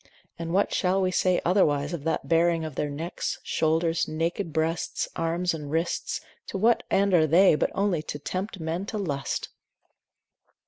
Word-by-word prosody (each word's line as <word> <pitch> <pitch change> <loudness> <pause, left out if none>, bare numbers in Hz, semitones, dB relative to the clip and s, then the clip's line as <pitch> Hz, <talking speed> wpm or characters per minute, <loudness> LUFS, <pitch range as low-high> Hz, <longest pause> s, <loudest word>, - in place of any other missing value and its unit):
And 165 0 -4
what 195 +3 +2
shall 185 0 +2
we 185 -1 +1
say 185 0 +2
otherwise 150 -5 +2
of 160 -3 -5
that 165 - -1
baring 165 0 +2
of 155 - -6
their 145 +2 -2
necks, 160 +5 -4
shoulders, 165 +1 +1
naked 165 +3 -2
breasts, 160 +2 -1
arms 170 +2 0
and 150 -3 -6
wrists, 165 +3 -1 0.3
to - - -4
what 225 +4 +3
end 200 0 +2
are 160 -3 +5
they 180 +5 +6
but 150 - +1
only 195 -5 +1
to - - -3
tempt 190 +6 -4
men 165 +4 -3
to 215 - -3
lust! 145 -9 -3
165 Hz, 170 wpm, -26 LUFS, 160-185 Hz, 0.3 s, they